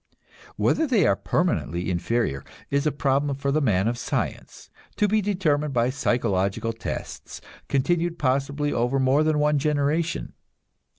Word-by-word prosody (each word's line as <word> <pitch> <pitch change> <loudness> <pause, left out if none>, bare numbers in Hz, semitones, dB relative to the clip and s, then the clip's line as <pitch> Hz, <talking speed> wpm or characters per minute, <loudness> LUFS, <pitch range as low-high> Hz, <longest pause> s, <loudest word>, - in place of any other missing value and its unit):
Whether 320 - +1
they 225 - +3
are 100 - +4
permanently 95 - -1
inferior 85 - -1 0.3
is 140 +2 +1
a - - +2
problem 140 0 0
for 140 +1 -1
the 155 +2 +1
man 105 -6 +2
of 120 +1 -1
science, - - -4 0.2
to 210 - +2
be 215 +1 +2
determined 155 -8 0
by 120 +1 +2
psychological 115 -4 0
tests, 115 - -6 0.3
continued 170 +5 +1
possibly 140 +2 0
over 125 +3 +1
more 130 +3 +3
than 155 -1 +1
one 150 0 +2
generation. 150 +3 0
140 Hz, 140 wpm, -24 LUFS, 120-155 Hz, 0.3 s, are